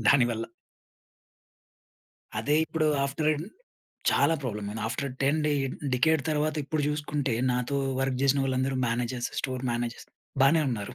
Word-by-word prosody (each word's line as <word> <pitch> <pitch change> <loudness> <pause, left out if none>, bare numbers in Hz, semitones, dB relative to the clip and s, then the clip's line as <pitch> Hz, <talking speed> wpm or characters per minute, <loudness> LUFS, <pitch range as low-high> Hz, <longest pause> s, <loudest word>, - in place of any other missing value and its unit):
దాని 135 0 +6
వల్ల. 115 0 -2 1.9
అదే 145 - +1
ఇప్పుడు 160 -1 0 0.2
ఆఫ్టర్ 140 +3 0
ఎన్ 155 +1 -3 0.7
చాలా 165 - +3
ప్రాబ్లమ్ 105 -5 -3
అయింది. 110 +1 -5
ఆఫ్టర్ 135 +4 -3
10 140 +3 +3
డే 150 - +2 0.4
డికేడ్ 160 +4 +3
తర్వాత 150 0 +1
ఇప్పుడు 150 +1 -1
చూసుకుంటే 150 -3 -1 0.2
నాతో 125 +3 -1 0.2
వర్క్ 135 -1 0
చేసిన 140 0 +3
వాళ్ళందరూ 130 0 0
మేనేజర్స్, 120 +1 -1
స్టోర్ 130 -1 -3
మేనేజర్స్ 120 0 -3 0.4
బానే 155 +3 +5
ఉన్నారు. 110 0 -4
135 Hz, 135 wpm, -28 LUFS, 120-150 Hz, 1.9 s, దాని